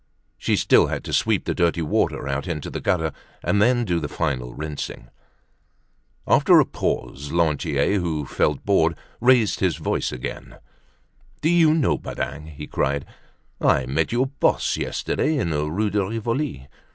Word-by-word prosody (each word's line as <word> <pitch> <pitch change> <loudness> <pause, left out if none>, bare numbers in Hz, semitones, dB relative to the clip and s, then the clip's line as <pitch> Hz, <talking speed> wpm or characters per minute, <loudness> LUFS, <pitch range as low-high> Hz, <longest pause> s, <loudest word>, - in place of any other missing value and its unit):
She - - +1
still - - +4
had - - -3
to - - -6
sweep - - +1
the - - 0
dirty 85 -1 +1
water 75 - 0
out 70 +1 -2
into 80 -5 -4
the - - -4
gutter, 80 -5 0 0.3
and 100 - +2
then 120 +2 +3
do 85 -4 0
the 75 - -3
final 65 -5 -2
rinsing. 75 -5 -6 1.2
After - - +6
a - - +5
pause, 70 +1 -3
Lantier, 80 +2 +1
who 80 -5 -2
felt 75 +1 0
bored, 85 -5 +3 0.2
raised 120 -3 +4
his 90 -5 +1
voice - - -1
again: 60 - -7 0.8
"Do 160 - +2
you 165 -2 +5
know, 155 -7 +1
Badingue," 75 +2 -5
he 75 -1 -8
cried, 70 0 -1 0.6
"I 65 - +3
met 70 +5 0
your 120 +3 +2
boss 140 +1 +1
yesterday 155 0 -1
in 85 -11 -1
the 75 0 -1
Rue 105 +6 -1
de 105 -1 +1
Rivoli. 115 - -3
85 Hz, 160 wpm, -23 LUFS, 75-110 Hz, 1.2 s, After